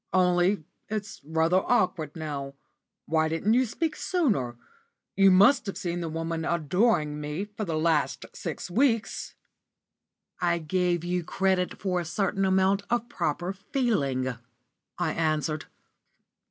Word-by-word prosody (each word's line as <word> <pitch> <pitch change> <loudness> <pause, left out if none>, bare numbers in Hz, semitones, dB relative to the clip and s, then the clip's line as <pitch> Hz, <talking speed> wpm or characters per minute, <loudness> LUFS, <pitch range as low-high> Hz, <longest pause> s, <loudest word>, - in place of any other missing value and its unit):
"Only 180 0 +3 0.3
it's 210 -1 -4
rather 160 +4 +2
awkward 185 - +1
now. 140 -4 -5 0.5
Why 160 0 +1
didn't 165 +7 +1
you 255 +1 +3
speak 315 +7 -2
sooner? 200 - 0 0.6
You 195 0 +6
must 200 +6 +5
have 195 - -4
seen 175 -1 -3
the 165 - -3
woman 165 0 -3
adoring 170 -1 +1
me 150 +6 -3
for 210 +1 -6
the 165 -3 -2
last 160 -1 +1
six - - -5
weeks." 230 +1 +1 1.0
"I 170 -1 +2
gave 175 +1 0
you 175 0 -1
credit 190 +1 0
for 185 -2 0
a 175 - -3
certain 195 +3 0
amount 190 +1 +3
of 240 0 0
proper 175 +5 -2
feeling," 180 - 0 0.6
I 175 -3 0
answered. 155 -1 0
180 Hz, 130 wpm, -27 LUFS, 160-200 Hz, 1.0 s, You